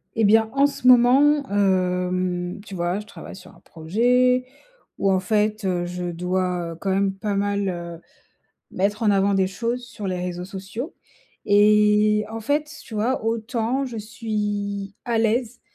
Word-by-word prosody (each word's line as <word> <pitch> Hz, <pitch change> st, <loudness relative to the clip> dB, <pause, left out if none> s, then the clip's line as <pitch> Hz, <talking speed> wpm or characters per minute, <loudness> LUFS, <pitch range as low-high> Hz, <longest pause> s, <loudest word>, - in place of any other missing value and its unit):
Et 225 Hz, -2 st, +2 dB
bien, 220 Hz, +1 st, +4 dB
en 275 Hz, 0 st, +4 dB
ce 280 Hz, -3 st, -1 dB
moment, 265 Hz, +4 st, +6 dB
hem, 180 Hz, -2 st, 0 dB
tu 195 Hz, -, -8 dB
vois, 175 Hz, +2 st, -1 dB
je 210 Hz, -, -9 dB
travaille 215 Hz, -, -11 dB
sur 190 Hz, -, -14 dB
un -, -, -20 dB
projet 245 Hz, +9 st, +1 dB, 0.5 s
où, 195 Hz, -, +1 dB
en 190 Hz, -, +2 dB
fait, 210 Hz, +2 st, 0 dB
heu, 180 Hz, -2 st, 0 dB
je 180 Hz, 0 st, -5 dB
dois, 180 Hz, 0 st, -2 dB
heu, -, -, -11 dB
quand 195 Hz, -, -3 dB
même 195 Hz, 0 st, +1 dB
pas 200 Hz, +1 st, -3 dB
mal, 200 Hz, 0 st, 0 dB
heu, 170 Hz, -2 st, -6 dB, 0.7 s
mettre 205 Hz, +4 st, -1 dB
en 215 Hz, -, +4 dB
avant 200 Hz, 0 st, +2 dB
des 190 Hz, -1 st, +2 dB
choses 235 Hz, +5 st, -3 dB
sur 215 Hz, -3 st, -7 dB
les 185 Hz, -1 st, -2 dB
réseaux 180 Hz, 0 st, -4 dB
sociaux 195 Hz, -, -7 dB, 0.6 s
et 210 Hz, +1 st, +4 dB
en 225 Hz, 0 st, -5 dB
fait, 290 Hz, +5 st, -1 dB
tu -, -, -15 dB
vois, 225 Hz, +3 st, -1 dB
autant 230 Hz, +3 st, -1 dB
je 240 Hz, -3 st, -7 dB
suis 205 Hz, -2 st, -4 dB
à 235 Hz, -1 st, 0 dB
l'aise 230 Hz, +2 st, 0 dB
205 Hz, 170 wpm, -23 LUFS, 185-230 Hz, 0.7 s, moment